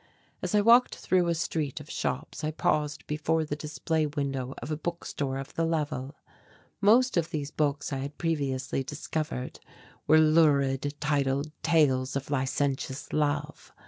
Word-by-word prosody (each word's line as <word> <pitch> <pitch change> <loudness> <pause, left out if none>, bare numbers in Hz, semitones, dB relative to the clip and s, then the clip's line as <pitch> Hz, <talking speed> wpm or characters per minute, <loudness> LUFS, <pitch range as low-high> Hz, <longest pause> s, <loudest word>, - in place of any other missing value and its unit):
As - - -1
I 210 - +5
walked 235 +4 +6
through 180 -2 +1
a 170 - +1
street 155 -4 -2
of 150 - -11
shops. 135 +4 -3
I 155 - 0
paused 150 -1 0
before 155 +1 0
the 145 - -3
display 155 +1 -1
window 135 -3 -3
of 155 - -6
a - - +1
bookstore 150 -4 -3
of 135 0 -7
the 165 - 0
level. 150 -4 -2 0.7
Most 235 +3 +5
of 165 -1 +1
these 150 -3 -4
books 145 -2 -1
I - - -1
had 140 +2 -6
previously 140 -6 -1
discovered 150 -2 -4 0.5
were 155 - +7
lurid 145 -3 +3
titled 145 -1 0
tales 135 -6 +2
of 140 +1 -3
licentious 135 0 -1
love. 150 -1 -1
150 Hz, 150 wpm, -28 LUFS, 140-160 Hz, 0.7 s, were